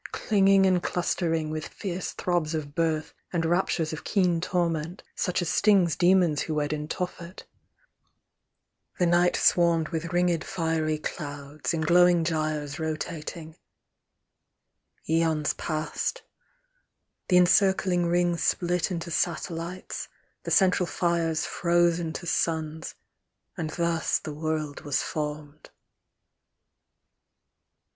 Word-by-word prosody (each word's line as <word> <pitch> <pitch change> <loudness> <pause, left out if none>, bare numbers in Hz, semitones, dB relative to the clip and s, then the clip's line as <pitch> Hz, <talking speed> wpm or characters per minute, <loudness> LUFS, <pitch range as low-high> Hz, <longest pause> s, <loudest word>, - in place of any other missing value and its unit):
Clinging 195 -2 +4
and 185 -2 +3
clustering, 165 -3 -1
with 155 0 -4
fierce 185 -2 -5
throbs 170 -3 -1
of 145 -2 -5
birth. 160 -1 -1 0.2
And 170 -2 0
raptures 165 -2 0
of 155 - -6
keen 180 -5 +1
torment, 170 -1 -1
such 180 -1 -1
as 165 - -2
stings 185 -3 +3
Demons 175 -4 +3
who 155 - -3
wed 150 0 0
in 150 0 -4
Tophet; 180 +1 -5 1.5
the 180 - +2
night 175 +1 +3
swarmed 170 -2 +3
With 170 0 -4
ringed 175 -2 +1
fiery 160 -3 -1
clouds, 145 -1 -5
in 165 - -1
glowing 175 +1 +5
gyres 155 -2 -2
Rotating: 160 +1 -5 1.5
aons 160 -2 +1
passed: 155 -2 -3 1.0
the 180 - +4
encircling 180 -1 +3
rings 175 0 +1
Split 175 -1 +1
into 170 -2 -4
satellites; 170 +2 -3 0.3
the - - -6
central 185 -2 +3
fires 170 -3 0
Froze 175 0 +2
into 165 +1 -5
suns; 160 -1 -2 0.6
and 165 -5 -3
thus 170 0 0
the 155 - -7
world 155 -1 -3
was 145 -2 -1
formed. 150 -1 -5
165 Hz, 110 wpm, -27 LUFS, 155-175 Hz, 1.5 s, glowing